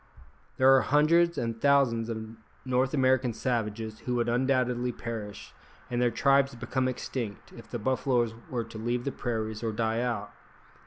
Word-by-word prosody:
There 135 +1 +7
are 130 - +5
hundreds 155 +8 +3
and 115 -1 -3
thousands 130 -5 +3
of 110 -1 -5 0.3
North 130 +1 +1
American 130 -2 +2
savages 110 -3 -2
who 125 - -3
would 120 -1 +1
undoubtedly 125 0 +1
perish, 110 -4 -7 0.4
and 120 0 0
their 120 - +4
tribes 140 +1 +3
become 130 +2 -1
extinct, 120 -5 -5
if - - -12
the - - -3
buffaloes 125 -1 0 0.2
were 120 -2 -2
to 110 -1 -10
leave 120 +2 -1
the 140 - -2
prairies 110 -4 -3
or 115 -1 -1
die 110 +1 0
out. 115 -4 -2
120 Hz, 160 wpm, -28 LUFS, 115-130 Hz, 0.4 s, There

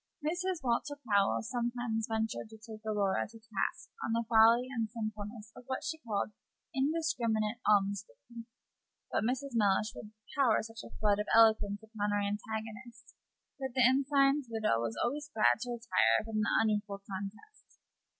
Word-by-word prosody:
Mrs. 355 0 -1
Walter 265 +4 0
Powell 200 0 +3
sometimes 240 -1 -2
ventured 220 0 -2
to 220 - -12
take 220 0 -11
Aurora 205 -3 +1
to 225 - -13
task 220 -3 -4
on 225 - -1
the 230 0 0
folly 230 +2 +6
and 225 -3 -1
sinfulness 215 -1 -6
of 250 - -12
what 260 0 -3
she 320 0 -3
called 215 -6 -2 0.4
indiscriminate 250 -7 0
almsgiving; 205 - -1 0.6
but - - +1
Mrs. 260 +3 -1
Mellish 210 -1 +2
would 210 - -9 0.3
pour 260 -6 +4
such 225 0 -8
a - - -10
flood 205 -1 +2
of 210 - -2
eloquence 220 -2 +4
upon 215 -2 -3
her 205 - +1
antagonist 220 +3 -5 0.5
that 265 -2 -4
the 255 -2 +5
ensign's 275 +1 +3
widow 215 - +1
was 115 -1 -3
always 290 +4 -3
glad 215 -2 +3
to 245 +1 -5
retire 225 - +2
from 220 -1 -3
the 225 - +1
unequal 210 -2 -1
contest. 205 - -8
225 Hz, 155 wpm, -32 LUFS, 210-245 Hz, 0.6 s, folly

